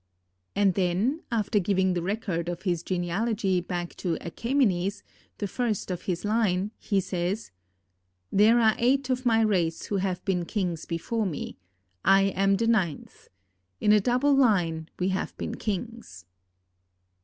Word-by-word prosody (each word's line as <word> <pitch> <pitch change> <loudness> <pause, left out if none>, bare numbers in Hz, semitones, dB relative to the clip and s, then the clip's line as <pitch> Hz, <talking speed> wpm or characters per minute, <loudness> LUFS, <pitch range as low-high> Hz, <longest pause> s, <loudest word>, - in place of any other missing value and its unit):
And 200 -2 +3
then, 195 - 0
after 215 -2 +1
giving 190 -1 +1
the 175 - -1
record 180 -3 -2
of 175 - -5
his 175 -4 0
genealogy 190 +2 0
back 175 -1 -4
to 175 -3 -1
Achæmenes, 200 - 0 0.3
the 205 - -2
first 220 -3 -2
of 180 - -3
his 180 +2 -2
line, 205 -3 +1
he 200 -2 0
says: 185 - -3 0.8
"There 220 +4 +5
are 220 -2 +5
eight 260 +2 +2
of 255 0 0
my 225 -1 +4
race 175 -7 +1
who 205 - -1
have 185 -2 -2
been 180 -3 0
kings 175 -5 -3
before 205 +6 -1
me; 155 - -5 0.4
I 195 0 +5
am 195 0 +2
the 230 - 0
ninth. 195 -10 -1 0.5
In 210 - +3
a 210 -1 +6
double 250 +6 +2
line 175 -11 +2
we 185 +1 0
have 190 0 -3
been - - -4
kings." 210 - -5
195 Hz, 150 wpm, -27 LUFS, 175-225 Hz, 0.8 s, a